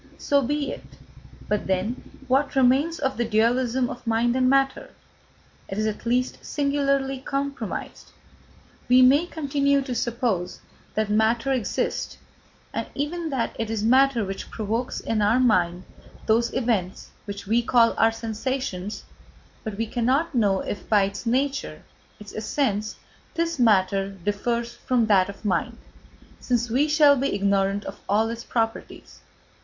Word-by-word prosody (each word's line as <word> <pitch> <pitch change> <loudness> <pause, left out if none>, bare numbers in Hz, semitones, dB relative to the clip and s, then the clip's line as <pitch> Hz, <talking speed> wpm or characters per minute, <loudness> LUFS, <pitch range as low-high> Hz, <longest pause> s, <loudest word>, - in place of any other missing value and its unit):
So 280 -1 +2
be 290 +2 -1
it. - - -11 0.5
But 210 -1 -1
then 190 +9 -3
what 275 +3 +1
remains 270 +6 +3
of 265 -2 -2
the 240 - +1
dualism 240 +3 +1
of 245 -1 -9
mind 230 +2 +2
and 255 -1 +3
matter? 270 0 +1 0.8
It 195 - -5
is 215 - 0
at 215 +1 -3
least 250 +2 0
singularly 275 -2 0
compromised. 275 -4 -4 0.8
We 255 +1 +7
may 285 +7 +5
continue 280 -3 +1
to 260 -2 -4
suppose 230 -7 -1 0.4
that 215 -1 0
matter 225 +5 +2
exists, 245 -6 -2 0.6
and - - -3
even 320 +4 -3
that 260 -5 -2
it 225 -1 -2
is 220 -2 -2
matter 255 -1 +4
which 195 0 -6
provokes 225 +3 -3
in 220 -2 -1
our 210 +4 +3
mind 180 -7 +2 0.4
those 230 +2 +2
events 220 -8 -2
which 200 -1 -7
we 225 +4 +2
call 235 -1 +4
our 225 0 +4
sensations; 225 -3 -4 0.6
but 215 -3 -5
we 225 - 0
cannot 255 +8 0
know 205 -6 +2
if 205 - -6
by 210 -2 +5
its 200 +4 -4
nature, 270 +4 -1 0.4
its 210 -2 -11
essence, 215 -2 -1 0.4
this 335 -3 -1
matter 195 -4 +3
differs 205 +5 -2
from 245 -3 0
that 200 -3 +3
of 200 +2 -10
mind, 195 - -1 0.6
since 240 -2 -1
we 275 +6 +3
shall 295 -1 +5
be 275 +1 0
ignorant 200 0 +1
of - - -7
all 215 +3 +3
its 230 0 -5
properties. 225 -1 -4
235 Hz, 145 wpm, -24 LUFS, 210-270 Hz, 0.8 s, We